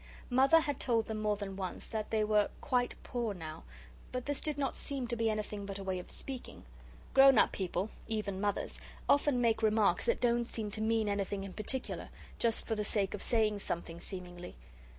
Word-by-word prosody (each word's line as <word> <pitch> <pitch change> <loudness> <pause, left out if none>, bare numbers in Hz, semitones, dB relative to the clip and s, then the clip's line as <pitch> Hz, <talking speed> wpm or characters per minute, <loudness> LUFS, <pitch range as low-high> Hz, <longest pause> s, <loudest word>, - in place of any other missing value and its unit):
Mother 270 +6 +6
had 290 -3 -2
told 230 -3 +2
them 215 -1 -4
more 210 -1 +2
than 200 -2 -5
once 190 -2 -4
that 215 -1 -3
they 220 -1 +2
were 210 -1 +3
'quite 250 -3 0
poor 235 -5 -2
now,' 160 -3 -7 0.5
but 250 -1 -3
this 285 -1 0
did 300 -2 -1
not 275 -3 -1
seem 270 -3 -2
to 240 - -1
be 225 -1 +1
anything 210 -1 -3
but 195 -1 -4
a 195 - -6
way 190 -1 -1
of 180 - -10
speaking. 265 -2 -7 0.5
Grown 270 -2 +8
up - - +5
people, 190 +2 -2 0.2
even 210 -3 -2
Mothers, 205 -1 -1 0.3
often 285 -2 +4
make 230 -2 +2
remarks 215 -4 +3
that - - +2
don't 240 -1 +2
seem 220 -3 -3
to 215 - -3
mean 220 0 +2
anything 200 -1 -1
in 195 -1 -7
particular, 250 +4 -3 0.3
just 230 -1 +2
for 225 - -1
the 210 -1 -1
sake 200 -2 +1
of - - -5
saying 215 -3 +2
something, 170 -3 -4
seemingly. 180 -2 -7
215 Hz, 200 wpm, -33 LUFS, 200-245 Hz, 0.5 s, Grown